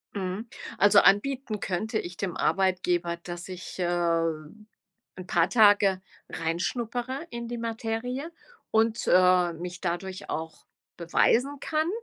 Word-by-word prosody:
Mhm. 195 +3 -4 0.3
Also, 205 0 +6
anbieten 230 +2 +2
könnte 215 +5 -2
ich 175 +1 -7
dem 185 -4 -3
Arbeitgeber, 180 -2 +1
dass 175 0 -8
ich, 185 0 -8
äh, - - +1 1.3
'n 185 -1 -8
paar 170 -1 +2
Tage 205 -4 +5 0.3
reinschnuppere 240 - -3
in 235 0 -5
die 240 0 -5
Materie 230 +6 -3 0.4
und, 225 +1 +1
äh, 180 -1 +4
mich 175 +1 -7
dadurch 185 +1 -4
auch 160 0 -5 0.3
beweisen 245 +11 +2
kann. 310 +2 -1
195 Hz, 120 wpm, -27 LUFS, 180-235 Hz, 1.3 s, Also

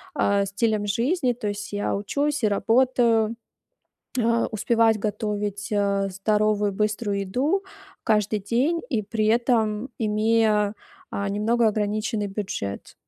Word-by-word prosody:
а, 200 -6 +2
стилем 205 +1 0
жизни, 250 - +1
то 235 -3 -5
есть 205 0 -5
я 205 -1 -1
учусь 285 +8 -1
и - - +5
работаю, 230 +1 +2 0.9
а, 230 0 +2
успевать 225 0 +2
готовить, 205 -1 -3
а, 200 -1 +1
здоровую 210 +1 +1
быструю 210 0 -1
еду 280 - 0 0.4
каждый 210 -2 +2
день 255 - 0
и 225 -4 0
при 215 +1 -1
этом 225 0 +1
имея, 215 -1 +2 0.4
а, 200 0 -2
немного 225 +4 +1
ограниченный 210 0 -1
бюджет. 195 - -5
215 Hz, 120 wpm, -24 LUFS, 205-230 Hz, 0.9 s, и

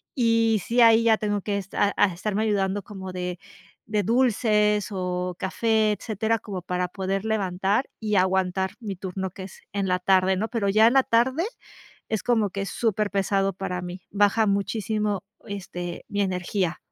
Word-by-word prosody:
y 230 -3 +3
sí, 240 +1 +2
ahí 230 0 +7
ya 220 -1 +4
tengo 205 -1 -1
que 200 +1 -2
esta 200 +1 0
ah, - - +6
estarme 205 +4 -2
ayudando 200 -2 0
como 190 -2 -8
de 180 -1 -4 0.5
de 210 -1 0
dulces 210 -3 +2
o 180 -1 -2
café, 220 +2 +1
etcétera, 220 +1 -1
como 200 -4 -6
para 180 0 -2
poder 195 +2 -3
levantar 200 +1 0
y 210 -2 -1
aguantar 190 0 +1
mi 205 -4 -5
turno 190 0 -4
que 190 - -9
es 190 - -11
en 200 -1 -1
la 180 - +2
tarde 190 +1 +3
¿no? 220 - -1
Pero 225 -4 0
ya 215 +3 +5
en 240 - +3
la 270 - +6
tarde 255 +8 +2 0.7
es 220 -2 -1
como 225 -4 +2
que 195 +1 -4
es 195 - -4
superpesado 200 -3 0
para 180 -2 -4
mí. 180 +1 -7
Baja 205 +2 +3
muchísimo, 205 0 -1 0.2
este, 175 -3 -6
mi 205 0 0
energía. 180 -1 -1
200 Hz, 170 wpm, -25 LUFS, 190-220 Hz, 0.7 s, ahí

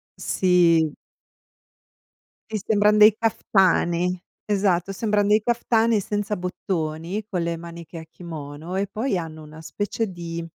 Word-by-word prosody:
sì. 170 -4 +3 1.6
Ti 215 - 0
sembran 210 0 +4
dei 210 0 +8
kaftani. 180 -5 +1 0.2
Esatto, 195 -3 +1
sembran 205 0 0
dei 210 +1 +5
kaftani 230 -1 +2
senza 205 +1 -2
bottoni, 180 +1 -3
con 180 -5 -2
le 170 0 -2
maniche 170 0 -9
a 160 - -8
kimono 160 0 -8
e 195 +1 -1
poi 220 +1 -1
hanno 160 -2 -6
una 155 +1 -12
specie 205 +5 -3
di 170 -2 -6
180 Hz, 125 wpm, -23 LUFS, 170-210 Hz, 1.6 s, dei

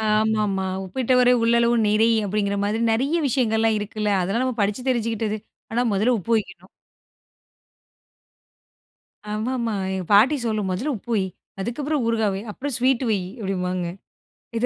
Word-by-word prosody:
ஆமாமா. 215 -2 +1 0.2
"உப்பிட்டவரை 250 +4 +3
உள்ளளவு 235 +1 +3
நினை!" 215 +2 +3 0.2
அப்படிங்கிற 200 0 -1
மாரி, 210 +2 0
நிறைய 265 +8 0
விஷயங்கள்லாம் 225 -4 +2
இருக்குல்ல, 210 0 -2
அதெல்லாம் 195 +8 0
நம்ம 255 -2 -2
படிச்சு 210 +6 -1
தெரிஞ்சுகிட்டது. 225 -3 -1 0.3
ஆனா, 240 +2 +2
முதல்ல 215 +6 +2
உப்பு 220 +4 -3
வெக்கணும். 210 - -9 2.6
ஆமாமா. 230 +1 -2 0.2
எங்க 190 -1 -3
பாட்டி 225 +9 +6
சொல்லும், 215 -3 -1
"முதல்ல 240 +12 -1
உப்பு 235 +4 -11
வை, 195 - +1 0.4
அதுக்கப்புறம் 280 +7 -2
ஊறுகாய் 225 -3 +1
வை, 195 - -4
அப்புறம் 285 +6 -5
ஸ்வீட்டு 255 +1 +2
வை" 210 - +2 0.2
அப்பிடிம்பாங்க. 185 -3 -2 0.7
இத 235 - +1
220 Hz, 130 wpm, -23 LUFS, 205-245 Hz, 2.6 s, பாட்டி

